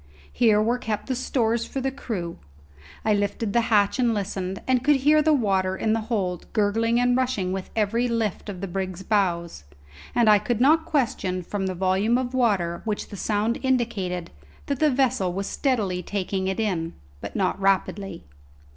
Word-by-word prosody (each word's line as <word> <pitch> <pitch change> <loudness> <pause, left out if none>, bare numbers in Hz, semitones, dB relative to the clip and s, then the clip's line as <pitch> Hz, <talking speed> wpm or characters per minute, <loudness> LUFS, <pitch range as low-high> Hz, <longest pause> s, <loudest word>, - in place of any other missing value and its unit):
Here 220 -4 +4
were 235 +3 +1
kept 215 -3 -3
the 260 - -2
stores 235 -2 0
for 270 - -4
the 265 0 -1
crew. 205 -11 -5 0.7
I 215 - +3
lifted 205 +1 -1
the 235 - +4
hatch 205 +2 +3
and 235 -3 +2
listened, 190 -1 -3
and 255 -1 +2
could 295 +1 +5
hear 300 +3 +4
the 310 +1 +3
water 190 -8 +1
in 220 +2 +1
the 225 - +1
hold 185 -6 -2
gurgling 225 +2 +2
and 245 0 +3
rushing 250 -8 0
with 190 -1 -5
every 225 +3 +1
lift 225 -3 -2
of 185 -3 -6
the 195 - -3
brig's 185 0 -4
bows; 175 - 0 0.5
and 235 -2 +4
I 210 -1 +7
could 225 +2 -1
not 315 +5 +4
question 210 - -1
from 195 +2 -3
the 185 - -3
volume 190 +6 +2
of 255 0 -3
water 195 -9 +1
which 215 -2 -3
the - - -8
sound 215 +4 0
indicated 220 -9 -1 0.3
that 280 -2 -2
the 310 - +4
vessel 255 -9 +1
was 195 +2 -3
steadily 205 -11 0
taking 190 0 -2
it 190 +2 -2
in, 175 -7 -1 0.3
but - - -7
not 190 0 0
rapidly. 195 - 0
210 Hz, 180 wpm, -24 LUFS, 190-245 Hz, 0.7 s, I